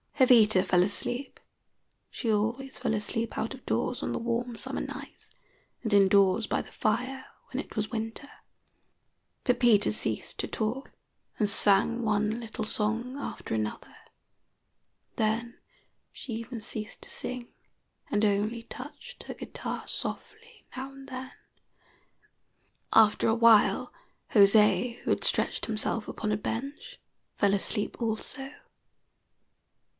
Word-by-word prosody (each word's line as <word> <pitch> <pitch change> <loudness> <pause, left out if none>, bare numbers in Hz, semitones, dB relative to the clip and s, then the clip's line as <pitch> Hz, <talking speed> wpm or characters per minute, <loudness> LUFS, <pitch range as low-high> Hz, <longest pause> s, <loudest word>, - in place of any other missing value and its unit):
Jovita 225 -7 +6
fell 180 -1 +4
asleep. 245 +7 -2 0.7
She 230 - -1
always 235 +6 -1
fell 240 -3 -1
asleep 225 +2 -2
out 225 +4 -2
of 260 - -17
doors - - -1
on - - -2
the - - -2
warm 235 +1 -2
summer - - -4
nights, - - -8 0.5
and 220 -3 -1
in 200 -1 +7
doors 200 +2 +4
by - - 0
the - - -13
fire 255 +5 -1 0.2
when 270 +2 -3
it - - -15
was 215 0 -1
winter. 225 +4 -4 1.1
Pepita 240 -5 +4
ceased - - -1
to - - -1
talk, 235 +5 -3 0.5
and 210 -2 +3
sang 210 +3 +4
one 215 +1 +1
little 225 -2 -5
song 225 +5 -1
after 285 - -5
another; 110 -1 -4 1.2
then 230 +2 0 0.5
she 250 - -7
even 230 +1 -5
ceased 215 0 -6
to - - -5
sing, 250 -1 -3 0.6
and 210 - +2
only 210 +3 0
touched 290 - -10
her - - -6
guitar - - -6
softly 450 +1 -6
now 265 +1 -5
and 270 0 -12
then. 260 0 -6 1.6
After 215 -1 +5
a 225 - +3
while 230 -2 +5 0.4
José, 210 +3 +5
who - - -2
had - - +1
stretched - - 0
himself 220 0 -1
upon 215 -1 -3
a 210 - +1
bench, 260 +7 -5 0.4
fell 200 -1 +3
asleep 205 +1 -1
also. 235 +4 -3
225 Hz, 130 wpm, -29 LUFS, 210-250 Hz, 1.6 s, in